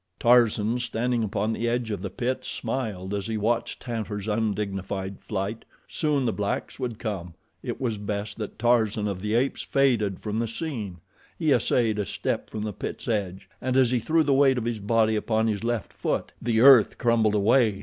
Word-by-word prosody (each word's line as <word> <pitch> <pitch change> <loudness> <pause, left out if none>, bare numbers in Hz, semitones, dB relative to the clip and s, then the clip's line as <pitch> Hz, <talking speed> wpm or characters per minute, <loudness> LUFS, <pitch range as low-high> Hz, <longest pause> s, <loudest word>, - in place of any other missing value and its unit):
Tarzan, 120 -1 +4
standing 120 0 -1
upon 105 +1 -1
the 120 +1 -1
edge 120 -1 -1
of 100 - -3
the 100 - -4
pit, 130 +3 -2
smiled 105 -7 -4
as 100 0 -2
he 110 -1 -2
watched 115 +3 -1
Tantor's 110 -4 -4
undignified 100 -3 -2
flight. 100 +2 -4 0.2
Soon 150 -4 0
the 115 - +1
blacks 100 +5 -3
would 120 -4 -3
come. 95 -8 -5 0.3
It - - -5
was 115 -5 -2
best 105 0 -4
that 105 -3 -6
Tarzan 110 -2 +2
of 95 -2 -3
the 105 +2 -1
Apes 130 +3 +1
faded 115 -9 +1
from 105 0 -3
the 115 - 0
scene. 115 - -5 0.4
He - - +1
essayed 110 -3 +2
a 105 - 0
step - - -2
from 105 - -5
the 105 -1 -3
pit's - - -6
edge, 100 -4 -2
and 130 0 0
as 130 -2 +4
he 125 - +2
threw 160 +8 +2
the 140 -2 +2
weight 135 -1 +4
of 120 - -2
his 120 -2 -2
body 110 +1 +2
upon 110 +1 +1
his 110 -1 -1
left 115 -4 -2
foot, - - -2
the 115 -1 +1
earth 130 -5 +7
crumbled 115 -3 +2
away. 110 0 +3
110 Hz, 190 wpm, -26 LUFS, 105-120 Hz, 0.4 s, earth